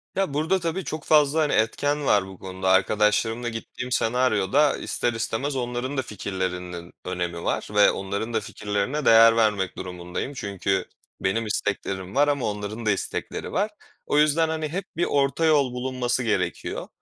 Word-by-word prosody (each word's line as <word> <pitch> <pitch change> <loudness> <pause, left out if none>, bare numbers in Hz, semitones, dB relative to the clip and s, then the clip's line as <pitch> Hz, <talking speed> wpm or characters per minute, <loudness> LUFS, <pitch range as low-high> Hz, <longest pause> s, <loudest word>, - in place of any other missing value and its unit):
Ya, 190 -7 0
burada 160 +6 +1
tabii 170 +2 -2
çok 155 -1 -5
fazla, 150 0 +4
hani, 150 -2 +1
etken 145 +6 +1
var 100 -5 +3
bu 95 -1 -11
konuda. 95 0 -3
Arkadaşlarımla 105 +4 +2
gittiğim 125 +2 -6
senaryoda 125 +3 +2
ister 120 - -1
istemez 115 +5 -2
onların 125 +2 -3
da - - +2
fikirlerinin 90 -4 -5
önemi 90 -2 -3
var - - -1
ve 105 - +6
onların 100 +4 -4
da 110 - +2
fikirlerine 105 +8 -2
değer 115 0 +7
vermek 105 -5 +1
durumundayım. 90 +8 -5
Çünkü 100 -4 -1 0.4
benim 110 +4 0
isteklerim 100 -2 -3
var 145 +1 +4
ama 145 -3 0
onların 105 +2 -4
da 105 - +4
istekleri 100 - -3
var. 210 +2 0 0.3
O 145 - +1
yüzden, 155 +2 +4
hani, 155 -1 -2
hep 185 +4 -3
bir 175 - +2
orta 140 +3 +1
yol 140 -5 +3
bulunması 125 -1 -1
gerekiyor. 110 - -2
115 Hz, 160 wpm, -25 LUFS, 100-145 Hz, 0.4 s, değer